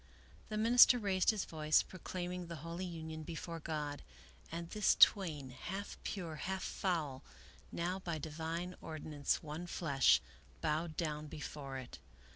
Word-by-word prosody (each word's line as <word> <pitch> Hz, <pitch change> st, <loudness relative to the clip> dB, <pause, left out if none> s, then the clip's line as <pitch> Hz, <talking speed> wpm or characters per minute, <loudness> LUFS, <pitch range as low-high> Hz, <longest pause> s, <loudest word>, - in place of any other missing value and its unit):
The 215 Hz, -, -2 dB
minister 240 Hz, +3 st, +8 dB
raised 195 Hz, -5 st, +2 dB
his 215 Hz, -3 st, +2 dB
voice, 155 Hz, -1 st, +3 dB
proclaiming 180 Hz, -1 st, -5 dB
the 170 Hz, -, -5 dB
holy 170 Hz, +2 st, -4 dB
union 160 Hz, -2 st, -6 dB
before 165 Hz, +1 st, -5 dB
God, 150 Hz, -2 st, -3 dB, 0.5 s
and 170 Hz, +1 st, -4 dB
this 210 Hz, -1 st, +4 dB
twain, 155 Hz, -10 st, +5 dB
half 190 Hz, +10 st, -5 dB
pure, 170 Hz, -6 st, -4 dB
half 190 Hz, +5 st, -3 dB
foul, 155 Hz, -8 st, -1 dB, 0.5 s
now 180 Hz, +3 st, -1 dB
by 170 Hz, -4 st, -3 dB
divine 165 Hz, +4 st, -4 dB
ordinance 155 Hz, -2 st, -2 dB
one 155 Hz, +3 st, -5 dB
flesh, 140 Hz, -6 st, +4 dB, 0.4 s
bowed 155 Hz, +1 st, -1 dB
down 150 Hz, -2 st, -2 dB
before 145 Hz, -2 st, -6 dB
it. 130 Hz, -, -8 dB
165 Hz, 135 wpm, -36 LUFS, 150-180 Hz, 0.5 s, minister